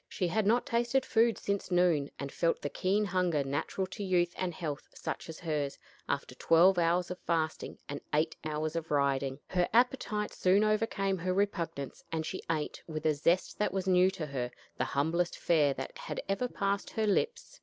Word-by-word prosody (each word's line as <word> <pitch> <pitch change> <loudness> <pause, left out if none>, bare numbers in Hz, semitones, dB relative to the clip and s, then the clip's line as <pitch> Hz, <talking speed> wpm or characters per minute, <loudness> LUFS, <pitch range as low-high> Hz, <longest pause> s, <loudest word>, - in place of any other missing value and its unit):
She 180 - -1
had 200 +3 +1
not 235 +3 +3
tasted 240 +3 +1
food 230 0 +3
since 200 -1 -2
noon, 175 -6 +3
and 140 0 -5
felt 165 -1 0
the 145 - -2
keen 200 +3 +1
hunger 180 -6 +1
natural 145 +7 -2
to 195 +3 -6
youth 175 -2 +2
and 185 -1 -2
health 155 -4 -5
such - - -5
as 160 - -7
hers, 150 -4 -2 0.3
after - - -2
twelve 175 +3 +5
hours 175 +1 +2
of 180 - -5
fasting 160 -2 -2
and 145 0 -5
eight 155 +2 +1
hours 155 +1 -2
of 165 -1 -3
riding. 140 -2 +1
Her 180 -1 0
appetite 230 -3 +1
soon 190 +3 +3
overcame 215 -3 +1
her 185 +2 -1
repugnance, 170 -8 -2
and 160 -1 -1
she 185 - -4
ate, 155 -2 -2
with 155 -1 -5
a 155 - +4
zest 170 +5 +1
that 210 - +1
was 190 -1 -1
new 185 0 +5
to 175 -4 -4
her, 130 -4 -3 0.3
the - - 0
humblest 165 +5 0
fare 150 -5 +3
that 135 - -6
had - - -5
ever 195 +6 0
passed 200 -3 -1
her 220 - -1
lips. 465 - -1
175 Hz, 190 wpm, -31 LUFS, 155-195 Hz, 0.3 s, twelve